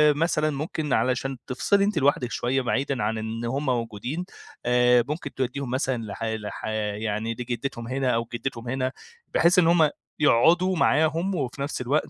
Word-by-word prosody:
مثلًا 155 -1 +1
ممكن 150 0 -3
علشان 130 +3 0
تفصلي 200 +10 +2
أنتِ 200 -4 0
لوحدِك 135 -3 +2
شوية 130 +2 0
بعيدًا 130 0 -1
عن 110 +2 0
إن 110 +2 -4
هُم 135 +5 -2
موجودين، 125 - -2 0.4
آآ، 125 0 +4
ممكن 150 +3 -4
توديهم 130 0 -3
مثلًا 130 -3 -1
لح 110 +1 -6
لح 110 -2 -4 0.3
يعني 110 +1 -2
لجدتهم 120 0 -4
هنا 130 0 0
أو 115 -1 0
جدتهم 120 0 -4
هنا، 130 0 -1 0.4
بحيث 175 +3 +5
إن 165 - +4
هُم 165 -2 +5 0.3
يقعدوا 170 +7 +4
معاهم، 165 +5 +2
وفي 140 -2 -3
نَفس 140 -2 -3
الوقت 140 +5 0
130 Hz, 160 wpm, -25 LUFS, 120-150 Hz, 0.4 s, بحيث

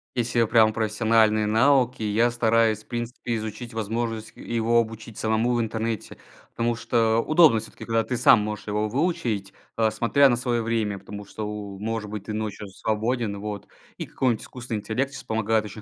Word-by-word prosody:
Если 120 -1 +1
прям 110 -1 +4
профессиональные 110 -1 +2
навыки, 125 +3 +3
я 110 +3 +2
стараюсь, 115 -2 +2
в - - -35
принципе, 120 0 -4
изучить 110 +2 -6
возможность, 110 0 -3
э, - - -13
его 115 0 +1
обучить 110 -1 -4
самому 110 +2 +1
в 120 - +1
интернете. 110 -1 -3 0.3
Потому 120 0 -1
что 115 -1 +1
удобно 155 -8 +5
всё-таки, 110 - -10
когда 115 -1 +1
ты 125 - -3
сам 115 - +6
можешь 105 0 -4
его 105 +1 -1
выучить, 115 - -1 0.2
э, 110 -1 +2
смотря 120 +6 +4
на 120 - +3
свое 120 -1 -1
время, 110 -3 -1
потому 100 +1 -9
что, 105 +2 -6 0.3
может 110 +1 -3
быть, 105 -1 -6
ты 110 - -5
ночью 105 -1 -4
свободен 110 +1 -2
вот. 105 -1 -6 0.3
И - - -5
какой-нибудь 125 -4 0
искусственный 120 -3 -5
интеллект 130 +6 -2
сейчас - - -8
помогает 110 0 0
очень 105 +1 -9
110 Hz, 175 wpm, -25 LUFS, 110-120 Hz, 0.3 s, сам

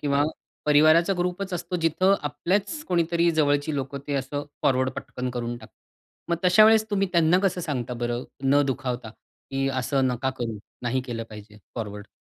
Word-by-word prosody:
किंवा 140 -1 +2 0.4
परिवाराचा 155 +5 +5
ग्रुपच 180 +2 -2
असतो. 175 +1 -3
जिथं 185 +5 +4
आपल्याच 185 - -1
कोणीतरी 170 -1 +2
जवळची 145 -1 +1
लोकं 140 0 -3
ते 145 - -2
असं 140 +2 -2 0.2
फॉरवर्ड 130 -1 +2
पटकन 125 0 -4
करून 120 -1 -3
टाकतात. - - -15 0.6
मग 170 - +2
तशा 180 +4 +7
वेळेस 220 0 +6
तुम्ही 195 -2 +1
त्यांना 170 +1 +4
कसं 185 -2 +1
सांगता 125 -7 -3
बरं, 120 +1 -2 0.2
न 140 +2 +4
दुखावता, 125 -3 -3 0.4
की 135 0 0
असं 135 0 0
नका 130 +1 -1
करू 115 -3 -3 0.2
नाही 125 +2 0
केलं 115 -2 -4
पाहिजे, 105 0 -12 0.2
फॉरवर्ड. 105 -2 -6
145 Hz, 160 wpm, -25 LUFS, 125-170 Hz, 0.6 s, तशा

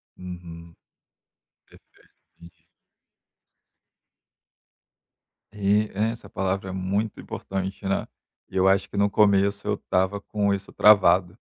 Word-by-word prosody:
Uhum. 85 -2 -10 0.9
Perfeito. - - -24 0.3
Entendi. 85 -1 -17 2.9
E, 105 +1 +1
é, 105 +3 0
essa 115 - -10
palavra 95 0 -2
é - - -4
muito 95 +3 -2
importante, 95 +1 -5
né. 95 0 0 0.4
Eu 95 0 +1
acho 95 0 +2
que - - -7
no 100 0 +3
começo 100 0 +2
eu 105 -1 0
tava 95 +2 +1
com 100 -1 0
isso 100 0 -5
travado. 95 -2 +4
95 Hz, 110 wpm, -24 LUFS, 95-100 Hz, 2.9 s, travado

